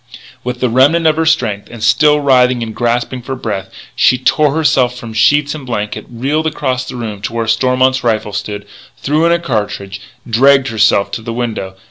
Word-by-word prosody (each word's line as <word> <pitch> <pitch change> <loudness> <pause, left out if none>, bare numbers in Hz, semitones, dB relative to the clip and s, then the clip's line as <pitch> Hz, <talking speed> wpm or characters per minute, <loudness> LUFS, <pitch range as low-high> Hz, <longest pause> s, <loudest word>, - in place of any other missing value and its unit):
With 125 0 -5
the 130 - +2
remnant 145 +7 +3
of 155 -1 +3
her 160 0 +1
strength, 115 -11 0
and 115 -2 -9
still 150 -1 +4
writhing 125 -3 +3
and 110 -1 -7
gasping 120 +1 -1
for 135 +2 -5
breath, 105 -6 -4 0.3
she 125 - +3
tore 145 +3 +2
herself 130 -6 +1
from 120 -2 -8
the - - -11
sheets 145 +6 +3
and 155 -3 -8
blankets, 105 -5 -4
reeled 140 +7 -1
across 130 -5 -2
the - - -7
room 110 -4 -6
to 110 - -5
where 115 -1 -1
Stormont's 130 +3 +1
rifle 110 -3 -1
stood, 105 0 -5 0.3
threw 155 +4 +1
in - - +2
a 170 - +3
cartridge, 105 - -4 0.3
dragged 135 +3 +4
herself 105 -3 +2
to - - -4
the 115 +1 -5
window. 110 -6 -4
125 Hz, 195 wpm, -14 LUFS, 110-140 Hz, 0.3 s, still